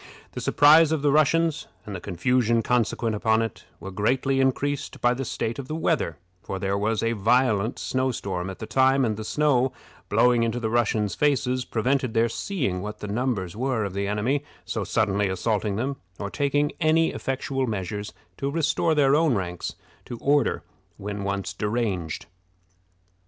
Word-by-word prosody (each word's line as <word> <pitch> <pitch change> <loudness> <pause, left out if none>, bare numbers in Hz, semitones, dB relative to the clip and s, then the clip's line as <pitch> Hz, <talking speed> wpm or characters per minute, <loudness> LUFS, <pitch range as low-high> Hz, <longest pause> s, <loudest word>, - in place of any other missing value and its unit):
The - - -6
surprise 155 +2 +6
of 155 -3 0
the 145 - +4
Russians, 155 +2 +2 0.2
and 105 - -6
the - - -4
confusion 115 +4 +1
consequent 115 -1 0
upon 110 +1 +2
it, 115 - -6
were 95 +3 -7
greatly 130 +7 +1
increased 140 +2 -1
by 120 0 +3
the 130 +2 -3
state 115 0 -3
of 135 - -6
the 155 - -4
weather; 155 - 0 0.2
for 95 - -5
there 95 0 -1
was 110 +2 0
a 115 - +1
violent 115 0 +2
snow 130 0 -1
storm 95 -6 -3
at 95 - -7
the - - -6
time, 130 +2 +3
and 110 -2 0
the 110 - -6
snow, 135 0 +2 0.4
blowing 120 -1 +4
into 115 +1 0
the 110 -2 -2
Russians' 110 -4 +1
faces, 130 -2 +1
prevented 130 +1 0
their 115 +1 +3
seeing 115 - -2
what 105 +2 -6
the 105 - -7
numbers 105 -5 -2
were 125 -1 -1
of 100 - -5
the 100 0 -2
enemy 115 +8 0 0.2
so - - -2
suddenly 100 -2 +1
assaulting 105 +2 -1
them, 135 +5 -2 0.2
or 100 -1 -5
taking 145 0 +1
any 160 +1 +3
effectual 135 0 -2
measures 105 -1 -4 0.3
to 140 - -2
restore 160 +1 +1
their 140 -1 +4
own 155 -4 +3
ranks 90 -3 -4 0.3
to 120 - -7
order 145 +4 +1 0.3
when 100 0 -5
once 100 0 -2
deranged. 105 -7 -2
120 Hz, 175 wpm, -25 LUFS, 105-135 Hz, 0.4 s, surprise